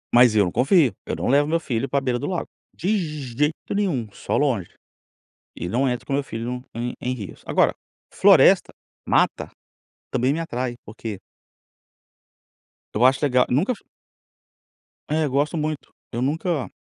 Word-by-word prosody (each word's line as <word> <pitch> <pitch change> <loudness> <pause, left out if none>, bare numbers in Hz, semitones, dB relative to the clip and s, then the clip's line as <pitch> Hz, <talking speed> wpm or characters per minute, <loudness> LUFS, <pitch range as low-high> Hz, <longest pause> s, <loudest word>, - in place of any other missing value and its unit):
Mas 120 -2 +7
eu 105 - +5
não 90 - -2
confio, 135 - +3
eu - - -2
não - - -3
levo 145 +3 +4
meu 165 +2 +1
filho 130 -4 -2
para 140 - +2
beira 125 -2 -1
do 145 - -3
lago, 180 -2 -2 0.2
de 195 +6 -1 0.4
jeito 150 +3 -1
nenhum, 180 - 0
só - - -2
longe, 120 -12 0 0.9
e - - -4
não 125 +9 +1
entro 125 -1 -3
com - - -4
meu 140 +1 +1
filho 115 -4 -6
no, 125 +1 -4
em 120 +1 -3
em 125 +1 -2
rios, 105 -7 -9
agora, - - +3 0.4
floresta, - - +6 0.4
mata, - - +2 0.6
também 130 +3 +1
me 165 - -2
atrai 125 -6 -3
porque 105 -2 -7 1.7
eu 110 - +1
acho 130 +1 +5
legal 125 -3 +4
nunca 175 - +2
fu - - -21 1.3
É 155 +1 +1
eu - - -1
gosto 145 +5 +1
muito, 155 -1 -3 0.2
eu 120 - -2
nunca 150 +1 -1
130 Hz, 165 wpm, -23 LUFS, 120-150 Hz, 1.7 s, Mas